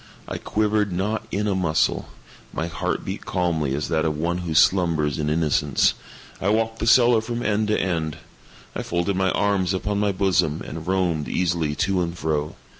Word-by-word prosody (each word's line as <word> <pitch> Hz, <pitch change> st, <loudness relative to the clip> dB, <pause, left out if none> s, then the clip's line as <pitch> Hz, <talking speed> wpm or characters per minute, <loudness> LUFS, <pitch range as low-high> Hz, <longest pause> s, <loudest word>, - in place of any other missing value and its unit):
I -, -, -4 dB
quivered 105 Hz, -1 st, 0 dB
not 105 Hz, +5 st, -2 dB
in 105 Hz, +2 st, -1 dB
a 100 Hz, -, +1 dB
muscle. 85 Hz, -4 st, 0 dB, 0.4 s
My 80 Hz, -, -2 dB
heart 85 Hz, 0 st, -3 dB
beat -, -, -5 dB
calmly 80 Hz, -6 st, 0 dB
as 75 Hz, -, -2 dB
that 80 Hz, -1 st, +1 dB
of 75 Hz, -2 st, -1 dB
one 85 Hz, +3 st, -1 dB
who 85 Hz, -3 st, -4 dB
slumbers 80 Hz, -4 st, +3 dB
in 75 Hz, -1 st, 0 dB
innocence. 75 Hz, -1 st, +2 dB, 0.5 s
I 95 Hz, -, +1 dB
walked 115 Hz, +1 st, 0 dB
the 115 Hz, -, -1 dB
cellar 120 Hz, -1 st, +6 dB
from 120 Hz, +1 st, -4 dB
end 105 Hz, 0 st, +1 dB
to 105 Hz, -, +1 dB
end. 80 Hz, -5 st, -1 dB, 0.6 s
I -, -, -2 dB
folded 85 Hz, +3 st, -1 dB
my 95 Hz, 0 st, +2 dB
arms 95 Hz, -1 st, +1 dB
upon 100 Hz, +2 st, -1 dB
my 105 Hz, -1 st, +2 dB
bosom, 90 Hz, -5 st, +1 dB
and 80 Hz, +1 st, -7 dB
roamed 90 Hz, -5 st, 0 dB
easily 85 Hz, -4 st, 0 dB
to 90 Hz, +4 st, +1 dB
and 85 Hz, 0 st, -3 dB
fro. 75 Hz, -2 st, -2 dB
90 Hz, 185 wpm, -23 LUFS, 80-100 Hz, 0.6 s, cellar